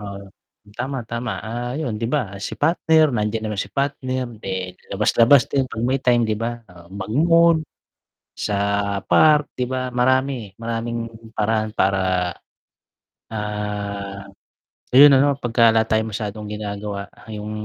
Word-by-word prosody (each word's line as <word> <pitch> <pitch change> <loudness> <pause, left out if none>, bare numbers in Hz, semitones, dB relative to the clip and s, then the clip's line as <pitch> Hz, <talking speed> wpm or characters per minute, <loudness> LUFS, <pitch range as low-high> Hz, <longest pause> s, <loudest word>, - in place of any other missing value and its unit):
Oo, 100 -1 -8 0.5
tama, 130 -1 -3
tama. 115 0 -3
Ah, 120 +2 -4
yun 125 -8 -2
'di 115 - -1
ba 145 - +2 0.2
si 110 - -5
partner, 160 0 +4
nandiyan 110 0 -1
naman 105 -2 -2
si 100 - -4
partner,'di 130 -6 -3 0.4
labas-labas 115 +6 +5
din 135 -2 +2
'pag 110 -2 -5
may 130 +1 +1
time, 120 -2 +3
'di 110 -1 -1
ba? 115 +1 -1 0.2
Oh, 85 -1 -16
mag-mall, 165 - +4 0.8
sa 105 - -2 0.5
park, 150 -2 +5
'di 125 - -2
ba 130 -1 -3
marami, 130 -2 +1
maraming 115 +1 -3 0.4
paraan 110 0 +1
para, 95 0 +2 1.3
ah, 105 -2 -4 0.7
ayun 145 +2 +10
ano, 140 +1 +3
pagka 115 -1 +3
wala 110 0 +3
tayong 110 0 0
masyadong 105 -1 -5
ginagawa, 105 -1 -5 0.2
yung 105 -1 -6
115 Hz, 135 wpm, -21 LUFS, 105-130 Hz, 1.3 s, ayun